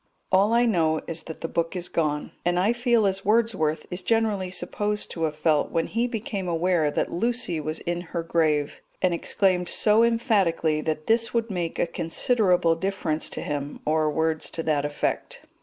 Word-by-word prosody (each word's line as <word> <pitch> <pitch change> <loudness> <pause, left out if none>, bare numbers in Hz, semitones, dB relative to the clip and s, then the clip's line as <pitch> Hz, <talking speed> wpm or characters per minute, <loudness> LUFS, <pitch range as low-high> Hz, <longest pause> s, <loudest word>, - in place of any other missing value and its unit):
All 195 +3 +4
I 235 +1 +4
know 160 -8 +2
is 165 -1 -4
that 160 - -8
the - - -2
book 165 +2 -2
is 180 -1 -2
gone, 150 -3 -1
and 175 0 +1
I 200 +6 +3
feel 240 -2 +2
as 195 0 0
Wordsworth 205 -8 +1
is 180 +1 -4
generally 215 -3 +1
supposed 205 +3 -3
to 165 -2 -1
have 155 -1 -3
felt 155 -1 +1
when 165 -1 0
he 235 +2 -1
became 215 -5 -4
aware 170 -2 +1
that - - -1
Lucy 225 -4 0
was 155 +1 -3
in 175 0 -2
her 170 -1 -4
grave, 155 -3 0 0.2
and 185 -1 +3
exclaimed 180 +1 +1
so 215 +1 +3
emphatically 195 - +2
that 155 0 -3
this 230 +1 +1
would 230 -1 0
make 175 -3 -3
a - - +2
considerable 175 +1 +2
difference 165 -3 -1
to - - -5
him, 145 -1 -4
or 155 0 +2
words 160 +1 -1
to 165 - -4
that 150 -2 +1
effect. 145 0 -3
175 Hz, 185 wpm, -25 LUFS, 160-210 Hz, 0.2 s, All